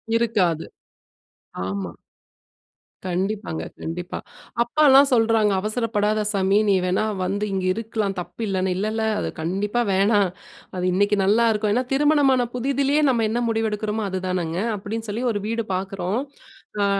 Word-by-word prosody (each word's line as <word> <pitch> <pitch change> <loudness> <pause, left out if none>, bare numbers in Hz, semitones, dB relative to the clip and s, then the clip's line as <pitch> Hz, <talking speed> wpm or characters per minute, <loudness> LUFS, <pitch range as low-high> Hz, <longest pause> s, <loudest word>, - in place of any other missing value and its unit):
இருக்காது. 195 -9 +1 1.0
ஆமா. 95 -2 -4 1.2
கண்டிப்பாங்க. 190 -1 -2 0.2
கண்டிப்பா. 175 +2 -5 0.5
அப்பா 270 +6 -1
எல்லாம் 275 +1 +7
சொல்றாங்க, 225 -3 +3
"அவசரப்படாத 215 -1 0
சாமி, 195 0 +2
நீ 195 - +5
வேனா 185 +4 +1 0.2
வந்து 205 +3 -1
இங்க 190 -1 -1
இருக்கலாம், 215 -3 -3
தப்பு 225 - -8
இல்லன்னு". 190 -1 0
"இல்ல 210 +2 -1
இல்ல 220 0 -1 0.2
அது - - -2
கண்டிப்பா 205 +8 -1
வேணா. 200 +2 +3 0.5
அது 180 0 -2
இன்னைக்கு 205 +2 +2
நல்லா 220 +4 +4
இருக்கும். 210 -1 0
ஏனா, 250 +1 +1
திருமணமான 275 -3 +3
புதிதிலே 275 +3 +1
நம்ம 225 -3 +1
என்ன 235 +2 -1
முடிவு 225 0 0
எடுக்கிறோமோ 210 0 -2
அது 185 - -2
தானங்க" 175 -2 -2 0.2
அப்டீன்னு 220 +2 -5
சொல்லி, 235 +4 -3
ஒரு 205 - -2
வீடு 230 0 -2
பாக்குறோம். 190 +2 -2 0.6
ஆ - - +3
210 Hz, 140 wpm, -23 LUFS, 190-230 Hz, 1.2 s, எல்லாம்